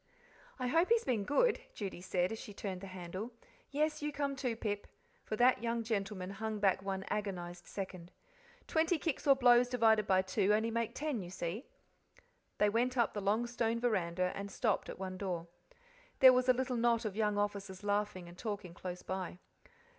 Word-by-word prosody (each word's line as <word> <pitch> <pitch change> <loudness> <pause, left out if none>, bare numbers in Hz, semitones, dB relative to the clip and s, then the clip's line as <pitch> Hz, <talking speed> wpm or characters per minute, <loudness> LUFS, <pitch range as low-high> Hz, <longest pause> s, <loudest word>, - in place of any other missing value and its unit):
"I 255 - -3
hope 330 +8 +3
he's 465 0 +4
been 220 -6 0
good," 430 - +3
Judy 195 -4 -5
said, 180 0 0
as 225 - -4
she 205 - -9
turned 190 -3 -4
the 195 - -7
handle. 185 +4 -6 0.4
"Yes, 300 +2 0
you 295 0 -1
come, 280 -1 -2
too, 255 -3 -2
Pip" 205 -2 -3 0.4
for 215 - -3
that 245 +2 +4
young 230 0 -1
gentleman 195 -4 -2
hung 215 +2 -3
back 195 -2 +2
one 195 0 -3
agonized 180 -4 -4
second. 185 -3 -6 0.5
"Twenty 325 +1 +2
kicks 310 -2 -2
or 275 - +8
blows 245 -1 +5
divided 220 -4 +4
by 190 -1 +4
two 200 +2 +2
only 225 +2 0
make 230 +1 -1
ten, 290 -7 -2
you 175 - -7
see." 180 - -4 0.9
They 210 - +4
went 245 +5 +1
up 235 -2 +2
the 205 - -3
long 210 +4 +2
stone 235 -1 0
veranda 185 -6 +1
and 200 0 -5
stopped 215 +1 0
at - - -6
one 185 -1 -5
door. 180 -4 -2 0.7
There 260 -1 +10
was 255 0 +2
a - - +8
little 255 0 -1
knot 235 -1 +2
of 205 -3 -3
young 210 -1 +1
officers 200 -1 -2
laughing 205 -3 -1
and 175 - -11
talking 205 -4 -5
close 180 0 -6
by. 185 -2 -4
210 Hz, 190 wpm, -34 LUFS, 190-245 Hz, 0.9 s, There